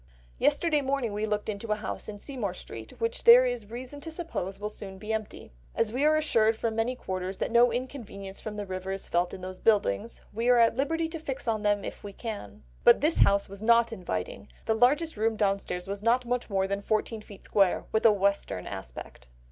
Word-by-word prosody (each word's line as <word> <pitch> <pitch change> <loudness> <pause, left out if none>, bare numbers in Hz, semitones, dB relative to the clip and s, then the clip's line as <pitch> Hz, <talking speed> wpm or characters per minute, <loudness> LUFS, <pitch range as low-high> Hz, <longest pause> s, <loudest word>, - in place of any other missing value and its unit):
"Yesterday 315 -4 +2
morning 265 -5 -1
we 210 +1 -1
looked 210 -1 -1
into 215 +1 -4
a - - +3
house 215 0 -5
in 205 - -6
Seymour 210 -5 -4
Street 115 -9 -10
which 230 0 -1
there 245 +2 +9
is 245 -4 -3
reason 255 +5 -7
to 325 - -5
suppose 310 - -4
will 210 - -3
soon 195 -2 -8
be 210 +3 -4
empty; 220 -1 -5 0.2
as 220 0 0
we 260 +3 0
are 310 0 +5
assured 225 -8 +2
from 225 -1 -2
many 230 +3 0
quarters 185 -4 -4
that - - -2
no 235 +1 +5
inconvenience 230 -6 -6
from 215 -1 -6
the 205 - -3
river 185 0 -5
is 195 0 -4
felt 175 +1 +1
in 185 - -8
those 185 0 -7
buildings, 210 - +1
we 230 +3 0
are 245 - +6
at 230 -1 +5
liberty 325 +5 0
to 330 0 -6
fix 275 -5 -5
on 220 -2 +1
them 205 -1 +1
if - - -7
we 200 -1 -7
can. 195 - -7 0.2
But 240 - +7
this 310 +3 +2
house 200 0 +4
was 200 +1 -10
not 235 +1 +4
inviting; 95 - -4 0.2
the - - +2
largest 280 +6 +2
room 220 +1 +1
downstairs 195 -3 -1
was 200 +1 -4
not 240 +3 +2
much 245 0 -2
more 195 -1 +1
than 200 +1 -2
fourteen 215 +1 -1
feet 205 -2 -13
square, 195 -3 +2
with 220 - +1
a 225 - +8
western 200 - 0
aspect." 65 -8 -8
215 Hz, 220 wpm, -28 LUFS, 195-245 Hz, 0.2 s, there